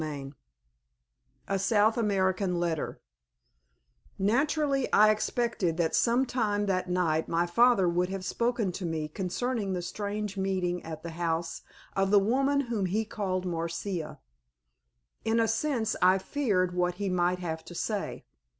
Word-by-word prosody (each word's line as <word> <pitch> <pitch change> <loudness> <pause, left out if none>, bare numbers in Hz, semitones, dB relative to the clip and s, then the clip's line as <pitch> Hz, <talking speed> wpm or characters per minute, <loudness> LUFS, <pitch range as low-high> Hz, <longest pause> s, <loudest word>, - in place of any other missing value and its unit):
CHAPTER 150 -3 -4
V 135 +1 -9 1.1
A 195 0 0
SOUTH 210 +2 +3
AMERICAN 190 -4 +1
LETTER 170 -3 -2 1.2
Naturally 275 +6 +1
I 215 +1 +6
expected 215 -5 -1
that 170 -2 +1
some 245 +3 +3
time 210 -5 0
that 185 -2 -1
night 165 -3 +1
my 170 +1 +2
father 215 +1 +4
would 175 +1 +1
have 190 -1 -4
spoken 235 -2 0
to 180 +1 -5
me 160 -2 -2
concerning 195 +5 -2
the 180 - -2
strange 205 +2 -4
meeting 185 -2 -1
at 160 -1 -7
the 170 - -5
house 165 0 -2 0.3
of 195 0 +2
the 205 - +6
woman 270 +7 +2
whom 230 -7 -1
he 210 +5 0
had 220 - -17
called 185 -3 -2
Marcia. 170 0 -3 1.1
In 225 +1 +2
a 225 - +3
sense 225 -1 0
I 185 +1 +6
feared 190 -5 0
what 180 0 0
he 200 +2 -3
might 180 -1 +1
have 160 -3 -4
to 175 - -10
say. 210 +3 -3
190 Hz, 150 wpm, -29 LUFS, 175-220 Hz, 1.2 s, I